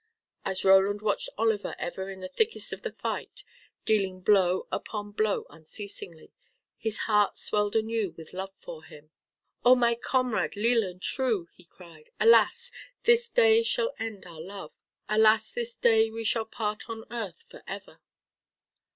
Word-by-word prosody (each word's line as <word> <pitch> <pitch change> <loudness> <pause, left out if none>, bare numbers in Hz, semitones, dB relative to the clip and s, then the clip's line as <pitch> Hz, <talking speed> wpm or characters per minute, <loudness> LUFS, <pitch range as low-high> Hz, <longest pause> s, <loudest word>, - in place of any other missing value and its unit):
As 190 0 -2
Roland 195 +2 +5
watched 210 -2 0
Oliver 220 -1 0
ever 190 +2 -4
in 190 -1 -8
the 185 - -5
thickest 445 - -1
of - - -7
the - - -4
fight, - - -5 0.4
dealing 195 -4 +1
blow 185 -2 +3
upon 205 -1 -4
blow 215 0 0
unceasingly, 165 0 -8 0.4
his 220 -1 -3
heart 210 -2 +2
swelled 210 0 0
anew 220 -3 0
with 160 -1 -12
love 190 +1 -5
for - - -10
him. 150 +1 -15 0.5
"Oh, 250 +2 +8
my 235 -1 +3
comrade 250 -1 0
leal 230 +2 +3
and 180 -2 -7
true," 220 -6 0
he 180 - -18
cried, 165 -3 -16
"alas! 230 - +5 0.3
this 475 0 +4
day 455 -2 +5
shall 470 +1 0
end 220 -4 -5
our 165 -3 -10
love. 195 +3 -8 0.4
Alas! 215 0 +4
this 235 -1 -4
day 225 -1 +4
we 225 +1 -5
shall 225 +1 +1
part 215 -1 -4
on 225 -1 -6
earth 235 - -6
for - - -13
ever." - - -8
215 Hz, 155 wpm, -28 LUFS, 190-230 Hz, 0.5 s, Oh